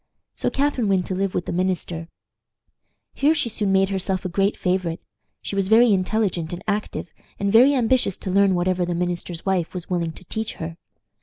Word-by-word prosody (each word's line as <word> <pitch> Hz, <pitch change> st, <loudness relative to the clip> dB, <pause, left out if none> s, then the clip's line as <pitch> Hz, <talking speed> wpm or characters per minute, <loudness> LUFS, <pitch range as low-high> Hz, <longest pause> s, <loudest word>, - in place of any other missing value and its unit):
So -, -, -1 dB
Catharine 270 Hz, -5 st, 0 dB
went 190 Hz, -2 st, +2 dB
to -, -, -3 dB
live 195 Hz, 0 st, -1 dB
with 175 Hz, -, -1 dB
the -, -, -4 dB
minister. 175 Hz, -2 st, -2 dB, 1.1 s
Here 300 Hz, +3 st, +3 dB
she 290 Hz, -6 st, 0 dB
soon 205 Hz, -2 st, 0 dB
made 195 Hz, 0 st, +3 dB
herself 190 Hz, -1 st, -2 dB
a -, -, -1 dB
great 195 Hz, +3 st, +1 dB
favorite. 180 Hz, -3 st, -1 dB, 0.4 s
She -, -, -4 dB
was 195 Hz, -1 st, +1 dB
very 225 Hz, +1 st, +6 dB
intelligent 185 Hz, -4 st, 0 dB
and 175 Hz, +2 st, -6 dB
active, 205 Hz, -5 st, -3 dB, 0.3 s
and 200 Hz, 0 st, 0 dB
very 260 Hz, +5 st, +7 dB
ambitious 245 Hz, -5 st, +2 dB
to 190 Hz, -, -5 dB
learn 195 Hz, 0 st, +4 dB
whatever 180 Hz, +1 st, +1 dB
the 175 Hz, 0 st, -1 dB
minister's 175 Hz, -1 st, -3 dB
wife 185 Hz, -3 st, 0 dB
was 180 Hz, 0 st, -6 dB
willing 170 Hz, -2 st, -1 dB
to 185 Hz, -, -15 dB
teach 220 Hz, +5 st, -4 dB
her. 165 Hz, 0 st, -6 dB
190 Hz, 190 wpm, -23 LUFS, 175-210 Hz, 1.1 s, very